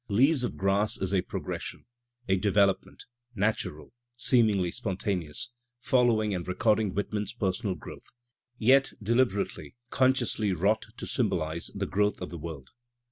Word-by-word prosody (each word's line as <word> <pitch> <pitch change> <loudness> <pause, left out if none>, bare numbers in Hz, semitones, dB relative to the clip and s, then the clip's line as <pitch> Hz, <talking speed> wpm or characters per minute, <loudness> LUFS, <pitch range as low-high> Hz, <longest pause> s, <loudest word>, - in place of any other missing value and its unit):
"Leaves 130 +7 +4
of 120 - -3
Grass" 100 +2 +1
is 95 0 -2
a 95 - +3
progres - - -5
sion, - - -7 0.4
a 95 - +3
development, 100 0 +1 0.3
natural, 95 -7 -2 0.2
seemingly 110 -8 +3
spontaneous, 100 -1 -3 0.3
following 120 -4 +2
and 90 -2 -4
recording 105 +2 +2
Whitman's 105 +1 -2
personal 100 -2 -1
growth, 80 - -11 0.5
yet 135 +4 +4
deliberately, 115 -2 0 0.2
consciously 125 -6 +2
wrought 100 +6 +1
to - - -5
symbolize 85 - -1
the 100 -1 -1
growth 105 +2 +1
of 90 - -6
the 85 - -6
world. 75 -4 -7
105 Hz, 135 wpm, -28 LUFS, 95-115 Hz, 0.5 s, Leaves